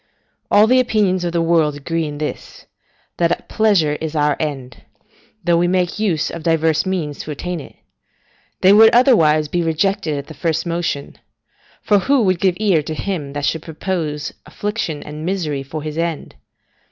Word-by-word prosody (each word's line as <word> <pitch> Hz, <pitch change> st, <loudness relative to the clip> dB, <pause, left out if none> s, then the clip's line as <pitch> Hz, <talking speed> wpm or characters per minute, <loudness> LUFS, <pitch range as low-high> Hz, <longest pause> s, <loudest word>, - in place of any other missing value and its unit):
All 210 Hz, +1 st, +6 dB
the 255 Hz, +3 st, +4 dB
opinions 205 Hz, -7 st, +1 dB
of 175 Hz, -, -1 dB
the 170 Hz, -1 st, 0 dB
world 165 Hz, -3 st, +2 dB
agree 165 Hz, +3 st, -2 dB
in 145 Hz, -1 st, -6 dB
this, 150 Hz, 0 st, -6 dB, 0.5 s
that 170 Hz, -1 st, 0 dB
pleasure 185 Hz, -9 st, +2 dB
is 160 Hz, 0 st, -4 dB
our 150 Hz, -1 st, +2 dB
end, 135 Hz, -6 st, -5 dB, 0.6 s
though 170 Hz, 0 st, +3 dB
we 175 Hz, +1 st, +2 dB
make 180 Hz, +1 st, 0 dB
use 180 Hz, -8 st, 0 dB
of 170 Hz, -, -7 dB
divers 160 Hz, +1 st, +1 dB
means 160 Hz, -7 st, -3 dB
to -, -, -7 dB
attain 175 Hz, +4 st, -4 dB
it: 140 Hz, -, -12 dB, 0.9 s
they 190 Hz, +2 st, +6 dB
would, 220 Hz, +2 st, +8 dB
otherwise, 160 Hz, -, +4 dB
be 175 Hz, +4 st, -1 dB
rejected 165 Hz, 0 st, 0 dB
at 140 Hz, -, -5 dB
the 160 Hz, -, -10 dB
first 165 Hz, +3 st, -1 dB
motion; 170 Hz, -4 st, -3 dB, 0.6 s
for 205 Hz, -1 st, +3 dB
who 265 Hz, +5 st, +2 dB
would 185 Hz, -3 st, +1 dB
give 185 Hz, -1 st, +1 dB
ear 195 Hz, -7 st, +3 dB
to 155 Hz, +1 st, -5 dB
him 155 Hz, -7 st, -4 dB
that 145 Hz, -1 st, -2 dB
should 160 Hz, -, -1 dB
propose 160 Hz, -2 st, -4 dB
affliction 205 Hz, -8 st, -4 dB
and 150 Hz, +1 st, -8 dB
misery 165 Hz, -6 st, -2 dB
for 145 Hz, +3 st, -6 dB
his 155 Hz, +1 st, -4 dB
end? 165 Hz, -2 st, -3 dB
165 Hz, 175 wpm, -19 LUFS, 150-185 Hz, 0.9 s, would